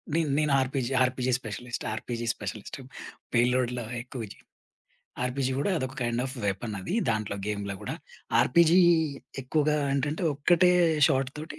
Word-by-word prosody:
నేను 165 -2 +1
నేను 150 -1 +2
RPG 130 -1 -2
RPG 130 0 0
specialist. 120 +1 -6
RPG 120 +1 -4
specialist. 105 +4 -7 0.5
పేలుడులో 125 0 +2 0.2
ఎక్కువ 125 -1 -7
జి - - -13 0.9
ఆర్‌పీజీ 130 +1 -1
గూడా 145 - 0
అదొక 130 0 -4
కైండాఫ్ 120 +3 -1
వెపనది 100 - -3 0.2
దాంట్లో 110 -2 -2
గేమ్‌లో 100 -2 -3
గూడా. - - -4 0.5
ఆర్‌పీజీ 170 +5 +5 0.6
ఎక్కువగా 150 +3 +1 0.2
ఏంటంటే, 145 +5 -1
ఒక్కటే 175 +5 +4 0.4
షాట్‌తోటి 135 +3 -2
130 Hz, 120 wpm, -27 LUFS, 115-145 Hz, 0.9 s, ఆర్‌పీజీ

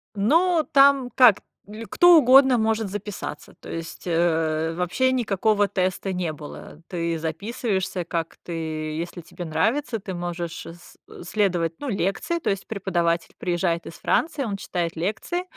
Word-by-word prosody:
Ну, 325 - +3
там 275 -2 +5
как, 245 -6 +7 0.3
или 220 +2 -8
кто 350 +5 +6
угодно 265 -2 +6
может 220 -2 0
записаться, 205 -6 -6
то - - -11
есть, 165 0 -7
э, 165 -1 +1
вообще 180 +10 +1
никакого 210 -3 +1
теста 185 0 -1
не 180 -4 -2
было. 150 +1 -10
Ты 170 -2 -2
записываешься, 190 +3 -2
как 165 -1 -4
ты, 175 - -8 0.5
если 170 +1 -5
тебе 175 +1 -9
нравится, 225 - 0
ты 190 -1 -6
можешь 175 -1 -5
с 170 +1 -13 0.3
следовать, 175 -4 0
ну, 290 - -5
лекции, 200 - -1
то - - -2
есть 195 -1 -2
преподаватель 175 -5 -1
приезжает 175 -1 -1
из - - -8
Франции, 295 - 0
он 200 -4 -3
читает 170 -4 -3
лекции, 220 - -2
190 Hz, 145 wpm, -24 LUFS, 170-230 Hz, 0.5 s, как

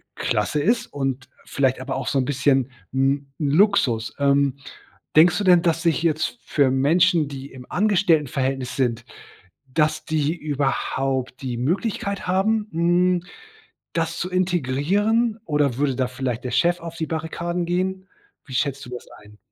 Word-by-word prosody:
klasse 150 - 0
ist 230 +7 +1
und 135 -2 -3 0.2
vielleicht 130 -2 0
aber 135 +1 -4
auch 135 - -4
so 140 - 0
'n 130 - 0
bisschen, 135 -1 +1 0.2
hm, 135 +2 +1
'n 145 -3 0
Luxus. 145 - +2
Ähm, 140 -1 +2 0.6
denkst 165 +3 +6
du 205 - -1
denn, 175 -2 +6
dass 165 0 0
sich 165 0 +1
jetzt 155 +8 0
für 140 -3 +2
Menschen, 160 +3 +3
die 135 0 -8
im 125 -1 -11
Angestelltenverhältnis 150 - +1
sind, 120 -4 -1 0.6
dass 155 +3 0
die 155 0 0
überhaupt 135 -3 -2
die 125 -2 -3
Möglichkeit 195 - -2
haben, 210 +4 +1
hm, 175 +2 +2 0.7
das 165 0 -1
zu 180 - -2
integrieren, 185 - +1
oder 145 -5 +1
würde 135 -2 +1
da 130 -2 0
vielleicht 125 -2 -4
der 125 - -3
Chef 175 +7 +2
auf 165 0 -8
die 160 - -2
Barrikaden 170 +2 -3
gehen? 185 +2 -2 0.4
Wie 135 - -10
schätzt 140 +1 -1
du - - -11
das 125 - -8 0.2
ein? 105 0 -17
150 Hz, 155 wpm, -23 LUFS, 135-175 Hz, 0.7 s, denkst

